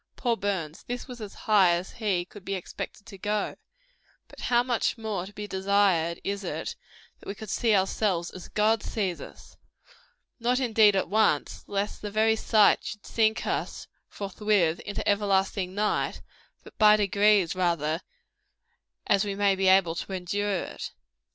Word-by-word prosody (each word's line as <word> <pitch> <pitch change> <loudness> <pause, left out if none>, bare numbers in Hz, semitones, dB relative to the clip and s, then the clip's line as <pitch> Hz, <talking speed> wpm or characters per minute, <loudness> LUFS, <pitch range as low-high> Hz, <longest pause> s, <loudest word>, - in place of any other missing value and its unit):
Poor 240 -3 0
Burns! 185 -7 -3
this 245 0 -5
was 245 -3 -9
as 205 -2 -8
high 195 -5 +4
as 175 +2 -5
he 200 -6 -1
could 200 +1 -13
be 195 0 -3
expected 190 +2 -7
to 200 -4 -12
go. 210 +1 -1 0.7
But - - -15
how 240 0 +2
much 245 -1 0
more 210 -5 -3
to - - -11
be 210 +1 -6
desired 190 -4 +1
is 200 0 -3
it, - - -4 0.4
that - - -15
we 200 - -4
could 215 -1 -8
see 225 -3 +2
ourselves 190 -2 0
as 185 - -10
God 215 +1 +2
sees 190 -5 -2
us? - - -13 0.8
Not 245 +2 +1
indeed 220 -5 +4
at 190 - +1
once, 205 -6 +1
lest 200 +1 -3
the 210 - -4
very 220 +2 +3
sight 215 -1 +4
should 210 - -7
sink 220 -1 +1
us, - - -3 0.2
forthwith, 200 -4 0
into 205 - -5
everlasting 195 -2 +1
night; 210 +1 -1 0.4
but - - -15
by 210 -1 +7
degrees, 205 -3 +3
rather, 170 -3 0 1.0
as 200 0 +3
we 200 -1 -3
may 200 -1 +3
be 190 0 0
able 185 -3 +5
to 180 +3 -5
endure 190 +1 -1
it. - - -7
200 Hz, 165 wpm, -27 LUFS, 190-215 Hz, 1.0 s, by